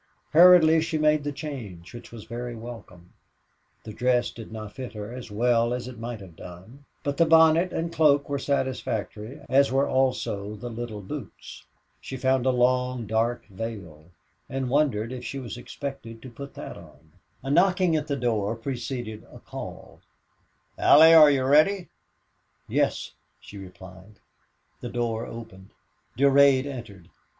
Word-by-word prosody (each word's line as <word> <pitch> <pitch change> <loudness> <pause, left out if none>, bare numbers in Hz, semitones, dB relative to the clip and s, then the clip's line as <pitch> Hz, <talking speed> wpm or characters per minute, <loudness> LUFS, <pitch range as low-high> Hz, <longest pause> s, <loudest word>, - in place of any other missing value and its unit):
Hurriedly 165 -1 +7
she 160 0 -2
made 150 -1 +2
the 145 - -2
change, 120 - -8
which 120 - -11
was 115 -3 -10
very 120 +1 -6
welcome. 110 -7 -11 0.7
The 110 - -9
dress 125 0 +1
did 115 -2 -11
not 110 -2 -8
fit 130 -3 -7
her 105 +1 -7
as 125 -2 -8
well 120 +2 +1
as 125 0 -6
it 125 -3 -9
might 115 -1 -6
have 90 -4 -13
done, 95 - -13 0.2
but 140 0 -2
the 170 - +5
bonnet 160 +2 +5
and 170 +1 -3
cloak 145 -3 +3
were 140 -1 -2
satisfactory, 130 -2 -3
as 140 +1 +3
were 135 +1 +2
also 125 -6 -1
the 120 +3 -7
little 115 -2 -6
boots. 115 +1 -9 0.4
She 130 - -7
found 130 0 +1
a - - +5
long, 125 -1 +1
dark 115 +3 -1
veil 95 -7 -8 0.4
and 130 -2 -3
wondered 130 -6 +1
if 125 -1 -7
she 140 - -5
was 120 -4 -6
expected 125 -2 -8
to 130 - -10
put 140 +4 -10
that - - -8
on. 80 +2 -17 0.3
A 135 - -3
knocking 180 +1 +3
at 150 -1 -2
the 140 - -1
door 115 -4 -1
preceded 120 -2 -5
a - - -12
call, - - -10 0.8
"Allie, 160 +3 +7
are 155 -2 +9
you 135 -2 +1
ready?" 155 +8 +3 0.8
"Yes," - - -1 0.3
she 100 - -12
replied. 95 +1 -13 0.6
The 120 - -6
door 115 -1 -2
opened. 95 -5 -10 0.5
Durade 140 0 +5
entered. 110 -10 -9
125 Hz, 155 wpm, -25 LUFS, 110-140 Hz, 0.8 s, are